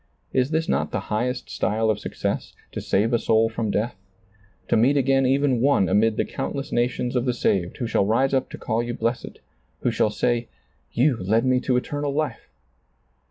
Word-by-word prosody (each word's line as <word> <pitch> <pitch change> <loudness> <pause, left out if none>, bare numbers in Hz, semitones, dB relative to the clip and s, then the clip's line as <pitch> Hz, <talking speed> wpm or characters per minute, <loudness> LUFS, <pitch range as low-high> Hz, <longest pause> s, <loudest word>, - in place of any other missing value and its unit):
Is 130 0 +2
this 160 +1 0
not - - 0
the - - -2
highest 125 +3 -2
style 110 +1 +1
of 105 - -3
success - - -4
— - - -34
to - - -5
save 110 +5 +1
a 120 - +3
soul 110 0 +3
from 115 -1 -3
death; 110 +4 -1 0.7
to - - +2
meet 125 +6 +4
^a!n 135 -1 +3
even 135 -2 +2
one 135 -8 +3
amid 105 +3 +2
the - - +1
countless 135 0 -4
nations 120 +1 0
of 125 0 +1
the 125 -2 0
saved, 90 -6 0
who 120 - -2
shall 100 -3 +1
rise 130 +6 +2
up 130 - +1
to - - -8
call 110 +2 -1
you 120 0 -4
blessed; 115 +2 -3 0.4
who - - +1
shall - - +2
say, 120 +2 0 0.4
"You 130 0 +2
led 110 +6 +1
me 130 0 +3
to 125 -1 +1
eternal 145 +2 -2
life 155 +1 -3
120 Hz, 200 wpm, -24 LUFS, 110-135 Hz, 0.7 s, meet